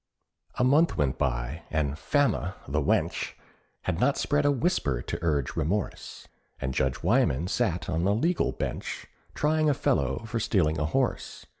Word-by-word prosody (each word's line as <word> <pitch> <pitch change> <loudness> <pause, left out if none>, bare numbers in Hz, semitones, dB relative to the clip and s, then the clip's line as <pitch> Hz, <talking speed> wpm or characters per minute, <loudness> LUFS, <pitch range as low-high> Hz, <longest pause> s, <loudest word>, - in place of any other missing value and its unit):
A 125 - +1
month 150 +6 +4
went 70 -3 0
by, - - -1
and 75 -3 0
Fama, 115 - 0
the - - 0
wench! - - 0 0.5
Had 90 -3 -1
not 140 +5 +2
spread 145 0 +1
a - - +5
whisper 130 - 0
to 85 - -4
urge 75 -5 0
remorse, 100 +7 -3 0.3
And 65 0 -2
Judge 65 0 -1
Wyman 70 +7 +2
sat 95 -4 0
on 80 +2 -1
the 100 +2 +3
legal 165 +10 +1
bench, - - -4 0.3
Trying 155 +1 +2
a 145 - +2
fellow 70 - 0
for 115 +1 -2
stealing 85 -7 +1
a 75 - +1
horse. 130 - -1
95 Hz, 160 wpm, -27 LUFS, -, 0.5 s, a